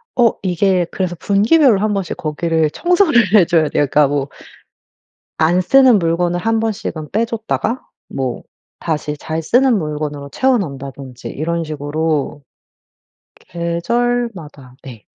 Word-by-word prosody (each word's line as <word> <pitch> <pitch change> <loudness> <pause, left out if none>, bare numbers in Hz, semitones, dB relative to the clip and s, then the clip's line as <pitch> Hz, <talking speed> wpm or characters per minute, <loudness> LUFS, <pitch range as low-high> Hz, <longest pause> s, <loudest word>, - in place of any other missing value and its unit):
어 235 -3 +4
이게 185 0 +1
그래서 185 -2 -2
분기별로 220 +4 +3
1 210 +1 0
번씩 195 -4 -3
거기를 160 0 0
청소를 315 - +2
해 195 -5 +7
줘야 165 -2 +2
돼요. 145 - +1
그러니까 150 +1 +4
뭐 140 -1 -1 1.1
안 175 +3 +3
쓰는 255 +2 +5
물건을 170 +1 0
1 225 +5 0
번씩은 195 -8 -4
빼 220 +3 +2
줬다가 230 +1 -2 0.3
뭐 130 -3 -4 0.4
다시 150 -2 -3
잘 160 +2 -4
쓰는 245 +7 +3
물건으로 150 -2 -4
채워 260 -1 +2
넣는다든지 135 - -7
이런 165 +3 -2
식으로 150 -1 -3 1.1
계절마다 170 - -2
네. 120 -6 -11
170 Hz, 270 characters per minute, -17 LUFS, 150-220 Hz, 1.1 s, 해